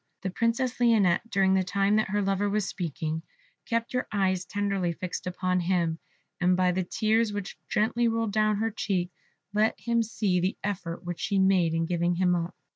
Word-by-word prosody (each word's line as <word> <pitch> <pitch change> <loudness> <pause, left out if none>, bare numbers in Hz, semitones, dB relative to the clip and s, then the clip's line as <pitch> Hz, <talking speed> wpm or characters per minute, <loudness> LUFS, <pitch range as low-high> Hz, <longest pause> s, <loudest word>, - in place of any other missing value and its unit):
The 190 - -2
Princess 235 +5 0
Lionette, 225 -4 +3
during 195 -2 +3
the 190 0 +3
time 200 +3 +1
that 215 - +1
her 205 +1 0
lover 195 +1 +1
was 210 0 0
speaking, 160 -3 -3 0.5
kept 230 0 -1
her 250 - -1
eyes 190 -3 +1
tenderly 195 -3 -1
fixed 180 +1 -5
upon 180 0 0
him, 170 -2 0 0.4
and 180 0 +3
by 185 -1 +3
the 185 +1 0
tears 220 +4 +1
which 205 -1 -5
gently 230 +3 +2
rolled 225 -1 0
down 215 0 +3
her 225 +2 -1
cheeks 185 -4 -2 0.4
let 215 +1 +2
him 235 -1 +1
see 210 -4 0
the 185 +3 -1
effort 180 -4 -4
which 175 -1 -5
she 200 - 0
made 190 -4 +3
in 165 0 +1
giving 175 +1 0
him 180 0 +2
up. 170 +1 -3
195 Hz, 190 wpm, -27 LUFS, 180-215 Hz, 0.5 s, Lionette